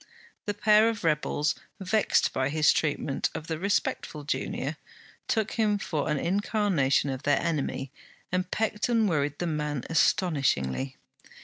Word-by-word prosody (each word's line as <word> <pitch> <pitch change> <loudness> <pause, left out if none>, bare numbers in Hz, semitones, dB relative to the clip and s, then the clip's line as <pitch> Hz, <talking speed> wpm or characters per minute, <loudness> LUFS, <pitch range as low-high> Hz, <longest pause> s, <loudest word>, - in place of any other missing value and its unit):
The 205 - -1
pair 215 +2 +5
of 225 -2 -4
rebels, 150 -2 +1 0.3
vexed 205 +3 +2
by 130 0 0
his 150 0 +4
treatment 145 -2 -1
of 155 - -5
the 160 -1 -4
respectful 180 -5 -1
junior, 145 - -3 0.5
took 220 -2 0
him 215 -3 +1
for 155 -6 -2
an 150 - +1
incarnation 180 -6 +1
of 130 -1 -5
their 145 -1 +2
enemy, 140 -4 -2 0.4
and 185 0 -1
pecked 220 +2 -1
and 225 -3 +3
worried 145 -4 0
the 175 - -2
man 150 -4 -2
astonishingly. 135 - +1
160 Hz, 140 wpm, -27 LUFS, 145-205 Hz, 0.5 s, pair